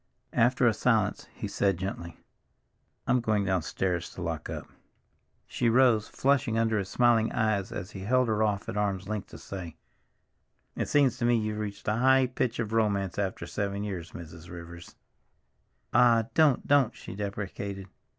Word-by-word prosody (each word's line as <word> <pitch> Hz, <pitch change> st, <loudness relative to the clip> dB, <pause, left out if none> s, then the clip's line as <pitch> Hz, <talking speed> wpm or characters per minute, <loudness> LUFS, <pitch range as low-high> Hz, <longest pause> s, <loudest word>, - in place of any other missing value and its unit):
After 125 Hz, +2 st, +3 dB
a 115 Hz, -, +5 dB
silence, 110 Hz, -2 st, +1 dB
he -, -, -6 dB
said 100 Hz, -3 st, +1 dB
gently, 85 Hz, -2 st, -5 dB, 0.9 s
"I'm 125 Hz, -, +3 dB
going 110 Hz, -3 st, +1 dB
downstairs 90 Hz, -1 st, -1 dB
now -, -, -16 dB
to -, -, -7 dB
lock -, -, -4 dB
up." -, -, -5 dB, 0.8 s
She 120 Hz, -, 0 dB
rose, 115 Hz, -3 st, +4 dB
flushing 135 Hz, -4 st, +1 dB
under 115 Hz, -1 st, +2 dB
his 95 Hz, -1 st, -4 dB
smiling 120 Hz, -2 st, +3 dB
eyes 110 Hz, -4 st, 0 dB
as 90 Hz, -, -6 dB
he 95 Hz, -, -8 dB
held 125 Hz, +6 st, +2 dB
her 110 Hz, -1 st, 0 dB
off 105 Hz, -2 st, 0 dB
at -, -, -4 dB
arm's 100 Hz, -2 st, -1 dB
length 105 Hz, -2 st, -3 dB
to -, -, -11 dB
say, 90 Hz, -5 st, -8 dB, 1.0 s
"It -, -, -2 dB
seems 140 Hz, -3 st, +3 dB
to 120 Hz, -, 0 dB
me 120 Hz, 0 st, +4 dB
you've 110 Hz, -1 st, -2 dB
reached 100 Hz, -1 st, -6 dB
a 105 Hz, 0 st, +1 dB
high 130 Hz, +2 st, +5 dB
pitch 125 Hz, -1 st, -2 dB
of 110 Hz, -2 st, -3 dB
romance 100 Hz, -4 st, +1 dB
after 95 Hz, -4 st, -2 dB
seven 100 Hz, +2 st, -3 dB
years, 95 Hz, -5 st, -5 dB
Mrs. 85 Hz, 0 st, -10 dB
Rivers!" 85 Hz, 0 st, -10 dB, 1.0 s
"Ah, 115 Hz, -2 st, +4 dB
don't, 155 Hz, -5 st, +4 dB
don't," 135 Hz, -5 st, +3 dB
she 110 Hz, -, -9 dB
deprecated. 100 Hz, -1 st, -5 dB
105 Hz, 170 wpm, -28 LUFS, 95-120 Hz, 1.0 s, a